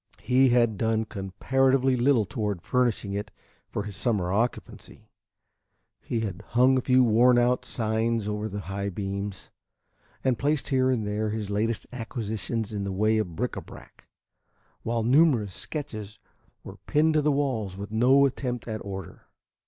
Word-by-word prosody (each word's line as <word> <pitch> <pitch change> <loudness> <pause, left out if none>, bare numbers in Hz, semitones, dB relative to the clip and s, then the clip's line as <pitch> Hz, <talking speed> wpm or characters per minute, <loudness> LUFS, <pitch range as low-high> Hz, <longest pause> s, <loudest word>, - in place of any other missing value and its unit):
He 130 +1 +4
had 120 -4 +2
done 110 -1 +1
comparatively 130 +7 +1
little 125 -3 +3
toward 105 -5 -3
furnishing 120 -5 0
it 100 +1 -3 0.4
for 105 - -3
his 105 -1 -7
summer 100 -5 0
occupancy. 115 +4 -3 0.9
He 115 - -3
had 100 -3 -4
hung 125 +5 +3
a 130 - +2
few 130 0 +4
worn 120 +2 +5
out 125 +1 +2
seines 110 -1 -1
over 105 +1 -2
the 100 0 -5
high 100 +1 -4
beams, 100 -1 -5 0.7
and 130 -3 +1
placed 145 +1 0
here 130 -1 +2
and 120 -5 0
there 105 +1 -1
his 105 -1 -4
latest 110 +2 -1
acquisitions 110 -2 -4
in 100 -1 -2
the 100 - -3
way 110 +3 +2
of 90 -6 -3
bric 125 +6 -1
à - - -6
brac, - - -15 0.8
while 115 0 -1
numerous 125 - +3
sketches 110 - -6 0.5
were - - -10
pinned 155 +2 +3
to 155 - +3
the 150 +1 +2
walls 125 -9 -1
with 100 +1 -7
no 130 +5 +5
attempt 125 -3 -3
at 110 -2 -4
order. 95 -1 -8
110 Hz, 160 wpm, -26 LUFS, 105-125 Hz, 0.9 s, worn